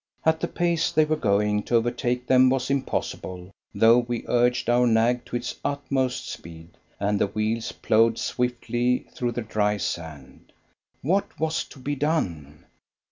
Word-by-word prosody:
At 160 0 +3
the 170 - -1
pace 170 -2 0
they 155 0 +4
were 155 +1 +1
going, 105 -4 +1
to 120 - 0
overtake 120 +1 0
them 130 0 +5
was 135 0 0
impossible, 95 -8 -3 0.2
though 115 +2 +5
we 120 -1 -3
urged 120 0 +2
our 120 +1 +4
nag 115 +2 +2
to - - -6
its 120 - -3
utmost 140 -3 -1
speed, 80 0 -9 0.3
and 100 0 0
the - - +3
wheels 110 +3 -2
ploughed 115 +1 +2
swiftly 125 0 -1
through 120 -1 -2
the 120 0 -3
dry 105 -1 0
sand. 80 -7 -6 0.5
What 190 +8 0
was 160 0 0
to - - -15
be 135 +2 -3
done? 90 - -2
120 Hz, 155 wpm, -25 LUFS, 105-130 Hz, 0.5 s, them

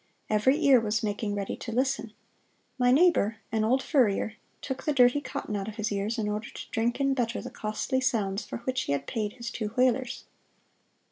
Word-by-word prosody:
Every 240 +7 +4
ear 270 -3 +7
was 220 0 -1
making 205 0 -2
ready 200 -1 -3
to 230 - -6
listen. 245 -2 -1 0.7
My 245 0 +4
neighbor, 265 - +4
an 220 0 +1
old 260 +5 +2
furrier, 220 -7 +2 0.3
took 265 -1 -5
the 300 - +1
dirty 250 +1 +5
cotton 210 - -4
out 195 0 -3
of 215 - -6
his 215 -1 -2
ears 205 +4 -1
in 215 -2 -1
order 210 +2 -3
to - - -9
drink 235 +3 0
in 275 -1 +2
better 240 -2 -1
the 250 - -7
costly 235 +4 -2
sounds 215 -5 0
for - - -6
which 255 +1 -1
he 140 - 0
had 140 0 -2
paid 210 +3 -2
his 235 -2 -6
two 215 -3 -3
thalers. 250 +2 +1
230 Hz, 200 wpm, -28 LUFS, 210-260 Hz, 0.7 s, ear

